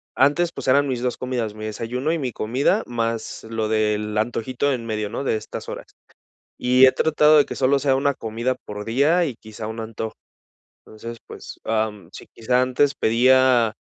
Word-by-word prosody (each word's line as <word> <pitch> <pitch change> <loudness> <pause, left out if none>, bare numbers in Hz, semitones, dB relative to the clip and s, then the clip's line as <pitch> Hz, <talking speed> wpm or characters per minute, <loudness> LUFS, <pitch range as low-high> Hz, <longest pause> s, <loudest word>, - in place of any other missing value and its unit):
antes, 155 +6 +3
pues, - - -7
eran 140 +2 +4
mis 125 -2 -2
2 125 -1 -2
comidas, 125 -4 -3
mi 110 0 -8
desayuno 125 +7 -3
y 165 - -1
mi 130 -3 -2
comida, 120 +7 0
más 115 -1 -3
lo 110 -1 -2
del 105 -1 0
antojito 120 +5 -1
en 120 -3 -3
medio, 105 -2 -3
¿no?, 125 +5 -4
de 120 - 0
estas 110 - -7
horas. - - -7 0.7
Y 125 +1 +5
he 130 - +5
tratado 155 -1 +4
de 145 - +5
que - - -6
solo 135 +1 +2
sea 135 -1 +2
una 140 0 +1
comida 115 +3 -2
por 105 0 -6
día 145 +10 +2
y 135 -7 -3
quizá 110 -1 -9
un 110 +1 -5
antojo 110 0 -5 0.7
entonces, 115 +2 -9
pues, - - -11
am, 110 -5 -2
sí, - - -11
quizá 125 +2 +1
antes 135 +3 +2
pedía, 125 0 +4
120 Hz, 185 wpm, -22 LUFS, 110-130 Hz, 0.7 s, Y